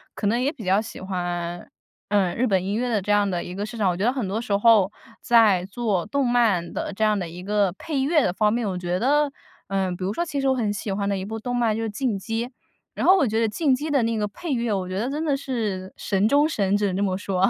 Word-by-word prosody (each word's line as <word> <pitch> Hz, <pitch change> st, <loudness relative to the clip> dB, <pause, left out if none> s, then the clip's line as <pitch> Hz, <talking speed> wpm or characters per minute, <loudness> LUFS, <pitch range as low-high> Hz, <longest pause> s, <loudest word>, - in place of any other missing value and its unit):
可 210 Hz, -, -4 dB
能 235 Hz, +4 st, +2 dB
也 280 Hz, +3 st, +1 dB
比 220 Hz, -, -10 dB
较 190 Hz, +2 st, +3 dB
喜 225 Hz, -, -9 dB
欢， 175 Hz, -2 st, -4 dB, 0.4 s
嗯， 195 Hz, -4 st, +2 dB
日 255 Hz, -, +2 dB
本 190 Hz, -3 st, +2 dB
音 200 Hz, +2 st, -2 dB
乐 250 Hz, +1 st, -1 dB
的 215 Hz, -4 st, +1 dB
这 205 Hz, -, -2 dB
样 205 Hz, -1 st, +3 dB
的 175 Hz, -2 st, -2 dB
一 180 Hz, -, -7 dB
个 205 Hz, +1 st, -3 dB
市 235 Hz, -, -8 dB
场。 200 Hz, -4 st, +2 dB
我 175 Hz, -, -4 dB
觉 200 Hz, -, 0 dB
得 250 Hz, -, +3 dB
很 255 Hz, -7 st, -2 dB
多 205 Hz, +4 st, -2 dB
时 215 Hz, -4 st, -1 dB
候 205 Hz, -2 st, +5 dB, 0.3 s
在 215 Hz, -6 st, +4 dB
做 205 Hz, -3 st, -1 dB
动 275 Hz, +5 st, 0 dB
漫 220 Hz, -8 st, +2 dB
的 -, -, -3 dB
这 220 Hz, -, -2 dB
样 215 Hz, -1 st, +3 dB
的 175 Hz, -, -3 dB
一 175 Hz, +2 st, -9 dB
个 205 Hz, -2 st, +1 dB
配 300 Hz, -5 st, -3 dB
乐 300 Hz, +2 st, +3 dB
的 180 Hz, -, +1 dB
方 210 Hz, +3 st, +2 dB
面， 235 Hz, -2 st, -1 dB
我 185 Hz, -2 st, -2 dB
觉 180 Hz, 0 st, -2 dB
得， 290 Hz, +3 st, +3 dB, 0.4 s
嗯 190 Hz, -2 st, -1 dB
比 185 Hz, -, -6 dB
如 200 Hz, -, -1 dB
说 345 Hz, -, -1 dB
其 290 Hz, -4 st, -3 dB
实 270 Hz, -, 0 dB
我 265 Hz, -, +4 dB
很 215 Hz, -4 st, 0 dB
喜 205 Hz, 0 st, -4 dB
欢 200 Hz, 0 st, -1 dB
的 200 Hz, -, 0 dB
一 190 Hz, -, -4 dB
部 220 Hz, +2 st, -5 dB
动 245 Hz, +2 st, -4 dB
漫 230 Hz, -3 st, +1 dB
就 225 Hz, -, -2 dB
《进 220 Hz, -1 st, -1 dB
击》， 225 Hz, +3 st, -2 dB, 0.5 s
然 -, -, -2 dB
后 375 Hz, -, +8 dB
我 280 Hz, -, +3 dB
觉 220 Hz, +1 st, 0 dB
得 230 Hz, -, +3 dB
《进 275 Hz, +4 st, +1 dB
击》 295 Hz, +5 st, -2 dB
的 270 Hz, -5 st, +3 dB
那 230 Hz, 0 st, 0 dB
个 210 Hz, -1 st, 0 dB
配 305 Hz, -, -5 dB
乐， 235 Hz, -2 st, -1 dB
我 185 Hz, -2 st, -2 dB
觉 185 Hz, +1 st, -3 dB
得 245 Hz, +4 st, -1 dB
真 300 Hz, +3 st, -2 dB
的 285 Hz, -2 st, +2 dB
是 215 Hz, -9 st, -3 dB
神 200 Hz, +1 st, +1 dB
中 290 Hz, +4 st, +4 dB
神 200 Hz, -9 st, 0 dB
只 205 Hz, -, 0 dB
能 185 Hz, -, -2 dB
这 -, -, -1 dB
么 185 Hz, -1 st, 0 dB
说。 190 Hz, -2 st, -2 dB
210 Hz, 305 characters per minute, -24 LUFS, 190-240 Hz, 0.5 s, 后